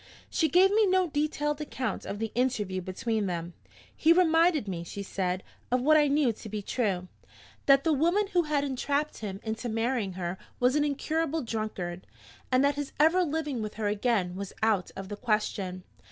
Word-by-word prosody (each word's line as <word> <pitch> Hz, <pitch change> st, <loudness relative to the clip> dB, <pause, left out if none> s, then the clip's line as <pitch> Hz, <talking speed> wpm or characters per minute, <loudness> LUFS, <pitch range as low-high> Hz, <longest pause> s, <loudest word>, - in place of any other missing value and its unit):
"She 320 Hz, -3 st, +2 dB
gave 370 Hz, +6 st, +5 dB
me 430 Hz, 0 st, +4 dB
no 370 Hz, -2 st, +2 dB
detailed 295 Hz, 0 st, -1 dB
account 255 Hz, -7 st, -3 dB
of 200 Hz, -, -4 dB
the 220 Hz, 0 st, -3 dB
interview 210 Hz, -7 st, 0 dB
between 210 Hz, +3 st, -2 dB
them. 170 Hz, -1 st, -4 dB, 0.4 s
'He 320 Hz, -, +4 dB
reminded 330 Hz, -, +4 dB
me,' 175 Hz, -3 st, -3 dB
she 200 Hz, +4 st, -6 dB
said, 185 Hz, -1 st, -2 dB, 0.3 s
'of 250 Hz, 0 st, +2 dB
what 310 Hz, +3 st, +5 dB
I 300 Hz, -1 st, +5 dB
knew 280 Hz, -4 st, +2 dB
to 215 Hz, -, -10 dB
be 210 Hz, 0 st, -4 dB
true 195 Hz, -6 st, -1 dB, 0.6 s
that 275 Hz, 0 st, +6 dB
the 320 Hz, -, +3 dB
woman 340 Hz, +8 st, +2 dB
who 355 Hz, -, +5 dB
had 300 Hz, -3 st, 0 dB
entrapped 285 Hz, +2 st, -1 dB
him 195 Hz, -3 st, -5 dB
into 225 Hz, +2 st, -3 dB
marrying 225 Hz, -3 st, -1 dB
her 180 Hz, 0 st, -4 dB, 0.2 s
was 250 Hz, +2 st, +3 dB
an 300 Hz, -, +3 dB
incurable 315 Hz, +2 st, -1 dB
drunkard, 215 Hz, -6 st, -4 dB, 0.4 s
and 255 Hz, +2 st, +4 dB
that 285 Hz, -, +3 dB
his 290 Hz, -1 st, -4 dB
ever 325 Hz, +5 st, +5 dB
living 300 Hz, -6 st, -2 dB
with 215 Hz, -1 st, -5 dB
her 210 Hz, -1 st, -1 dB
again 205 Hz, -4 st, 0 dB
was 195 Hz, 0 st, -6 dB
out 215 Hz, -5 st, +2 dB
of 195 Hz, 0 st, -6 dB
the 205 Hz, -, -5 dB
question. 205 Hz, -5 st, -1 dB
245 Hz, 185 wpm, -28 LUFS, 200-300 Hz, 0.6 s, that